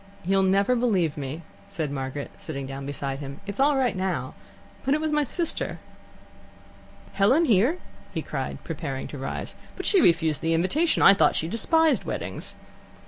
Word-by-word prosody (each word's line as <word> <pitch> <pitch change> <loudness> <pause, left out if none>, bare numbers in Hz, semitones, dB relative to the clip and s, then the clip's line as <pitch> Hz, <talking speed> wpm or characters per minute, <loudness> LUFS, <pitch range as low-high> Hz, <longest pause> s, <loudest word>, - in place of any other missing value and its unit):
"You'll 195 +1 +3
never 195 +5 +3
believe 195 -11 +1
me," 145 +3 -5 0.3
said 160 -7 -3
Margaret, 135 +1 -4
sitting 140 -4 -5
down 135 +1 -6
beside 140 -1 -4
him. 140 -1 -7
"It's 200 +2 -6
all 280 +1 +4
right 250 -6 +1
now, 185 -1 -2 0.5
but 270 - +2
it - - -1
was 310 0 -1
my 300 0 +2
sister." 335 +4 -3 1.4
"Helen 250 +12 +4
here?" 240 - +3 0.3
he - - -4
cried, - - -5
preparing 150 -5 -5
to 145 - -7
rise. 135 - -5 0.2
"But - - -6
she 390 -4 +4
refused 160 - +3
the 165 0 +1
invitation. 285 - +1
I 195 - +9
thought 200 - +3
she 160 - -1
despised 320 - +4
weddings." - - -5
190 Hz, 165 wpm, -25 LUFS, -, 1.4 s, I